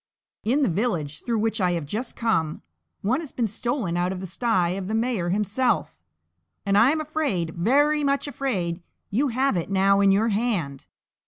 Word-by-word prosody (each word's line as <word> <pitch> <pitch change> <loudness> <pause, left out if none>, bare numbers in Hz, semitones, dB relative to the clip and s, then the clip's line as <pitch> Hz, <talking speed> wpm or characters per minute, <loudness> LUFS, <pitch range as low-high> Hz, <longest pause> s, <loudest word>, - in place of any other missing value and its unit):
In 270 +7 +2
the - - +3
village 170 -7 -2
through 235 -2 0
which 220 0 0
I 180 -1 +2
have 165 -3 -2
just 220 - -3
come, 165 -10 0 0.4
one 240 +8 +1
has 315 -5 -7
been 240 - -1
stolen 220 -3 -2
out 175 +1 0
of 190 - -4
the 190 - -5
sty 185 -1 +1
of 185 +1 -3
the 215 - -1
mayor 225 -6 0
himself; 210 +6 0 0.7
and 200 0 +2
I 225 +5 +6
am 315 +2 +1
afraid, 275 - -1
very 290 - +2
much 280 +1 +1
afraid, 190 -12 -2 0.3
you 260 +9 +2
have 260 -1 +1
it 170 0 -2
now 195 0 +3
in 200 -1 +5
your 215 +4 +3
hand! 200 - -1
210 Hz, 185 wpm, -24 LUFS, 180-250 Hz, 0.7 s, I